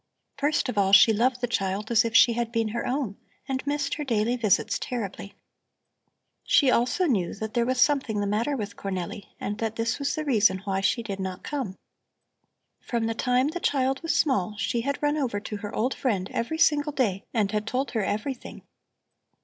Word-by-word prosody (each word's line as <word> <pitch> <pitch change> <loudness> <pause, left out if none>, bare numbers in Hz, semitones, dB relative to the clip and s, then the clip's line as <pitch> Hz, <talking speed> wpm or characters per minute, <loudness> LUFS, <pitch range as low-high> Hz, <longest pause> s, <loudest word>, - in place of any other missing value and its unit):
First 290 +1 0
of 225 -5 -1
all, 195 0 +2
she 220 +3 +8
loved 245 +3 +1
the 245 - 0
child 200 -1 -2
as 235 +1 +5
if 230 -1 -3
she 235 - +7
had 235 0 -2
been 225 -2 0
her 235 +2 -3
own 250 -6 -2 0.3
and 265 +1 -3
missed 285 -1 -1
her 300 - -3
daily 235 -2 +1
visits 220 -6 +1
terribly. 205 -5 -5 1.1
She 275 -4 +4
also 250 +11 +2
knew 200 - 0
that 220 +1 -5
there 235 -1 +1
was 255 0 0
something 265 -6 +2
the 205 - 0
matter 230 +8 0
with 205 -3 -5
Cornelli 190 0 -5
and 205 +1 -4
that 225 -1 -2
this 230 +3 -1
was 280 0 -1
the 310 - -3
reason 215 -8 +3
why 195 -1 -1
she 235 +4 +1
did 200 -3 -5
not 190 -1 -5
come. 260 -10 -4 1.0
From 235 -2 -2
the 225 - 0
time 250 +4 +1
the 350 +3 -4
child 270 -4 0
was 330 - -1
small, 210 - +1
she 225 +2 -1
had 280 +4 -3
run 295 +1 +2
over 245 -8 -1
to 210 0 -5
her 205 0 -6
old 250 +5 0
friend 200 -8 -2
every 235 +8 -2
single 295 -2 +3
day 210 -8 0
and 210 -4 0
had 210 0 -2
told 260 +4 -1
her 225 - 0
everything. 240 +6 -4
230 Hz, 200 wpm, -26 LUFS, 205-265 Hz, 1.1 s, she